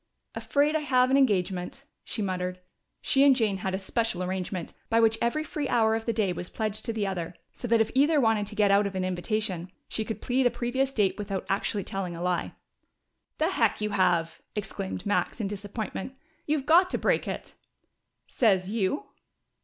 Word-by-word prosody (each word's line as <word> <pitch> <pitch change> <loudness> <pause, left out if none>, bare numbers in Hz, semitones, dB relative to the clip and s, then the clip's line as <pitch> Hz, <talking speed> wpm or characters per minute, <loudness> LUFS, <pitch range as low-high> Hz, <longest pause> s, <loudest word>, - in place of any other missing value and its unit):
"Afraid 295 +2 +1
I - - +3
have 255 -3 +3
an - - +5
engagement," 200 -1 +1 0.2
she 215 - -3
muttered. 185 -1 -2 0.4
She 275 -1 +4
and 280 -2 +7
Jane 215 -6 +1
had 190 0 -2
a - - -1
special 195 -1 -1
arrangement, 185 -1 -3 0.2
by 225 - +3
which 225 0 +3
every 235 +7 +1
free 300 -2 -3
hour 220 -2 +3
of 225 +1 -2
the - - +3
day 210 -5 0
was 175 +1 -6
pledged 215 -1 -2
to - - 0
the 220 -2 -1
other, 175 -3 -3 0.2
so 245 - -5
that 230 -1 +4
if 220 - 0
either 290 +4 +4
wanted 225 -4 +2
to 210 - -7
get 205 -2 +3
out 200 +1 +4
of 195 - -7
an 185 -1 -1
invitation, 185 -1 -2 0.2
she 220 - -2
could 220 0 -5
plead 255 0 +2
a - - +3
previous 260 +3 -1
date 210 -5 +1
without 195 -2 -3
actually 200 +1 0
telling 185 -2 -4
a 165 - -7
lie. 180 -1 -1 0.8
"The 315 +2 +2
heck 230 - +2
you 210 0 -1
have!" 175 -4 +1
exclaimed 195 -1 -4
Max, 205 +4 0
in 215 - -1
disappointment. 205 +4 -5 0.3
"You've 295 -2 0
got 350 +4 +6
to - - -1
break - - +1
it!" - - -5 0.7
"Sez 195 -5 +2
you?" 220 +5 0
215 Hz, 195 wpm, -27 LUFS, 190-245 Hz, 0.8 s, and